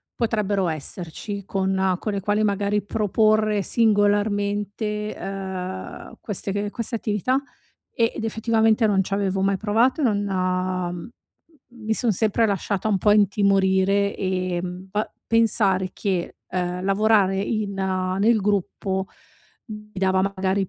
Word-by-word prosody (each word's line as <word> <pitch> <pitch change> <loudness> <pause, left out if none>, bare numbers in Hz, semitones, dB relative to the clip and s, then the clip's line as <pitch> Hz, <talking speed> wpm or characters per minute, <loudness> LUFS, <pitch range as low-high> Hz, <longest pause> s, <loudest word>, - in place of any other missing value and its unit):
potrebbero 210 -5 0
esserci 170 +5 -5
con 190 -1 0
con 215 - -3
le 200 - -1
quali, 205 +2 +1
magari, 205 0 +1
proporre 215 0 +2
singolarmente, 205 0 0
uhm, 190 -1 -6
queste 205 -1 -3
che 205 +1 -2
queste 230 +1 -3
attività, 225 +4 0 0.5
e 230 -2 +1
ed - - -5
effettivamente 225 0 +2
non 200 -2 +2
c' 195 - -3
avevo 195 -1 0
mai 195 0 +2
provato 225 +8 +1
e - - +2
non, 215 -5 +2
uhm, 185 -1 -2 0.7
mi 220 0 -1
son 235 0 +1
sempre 220 +3 +3
lasciata 200 0 -1
un 205 - +2
po' 210 - +3
intimorire, 200 -1 +3
ehm, 185 -1 -3
pa 210 +2 -2 0.2
pensare 205 -5 +2
che, 185 -4 -2
ehm, 180 0 -2
lavorare 195 -1 +3
in, 210 0 -1
uhm, 185 -1 -1
nel 220 +3 +4
gruppo 190 -1 -1 0.6
mi 210 -1 -9
dava 190 0 +1
magari 190 0 0
200 Hz, 130 wpm, -23 LUFS, 190-215 Hz, 0.7 s, nel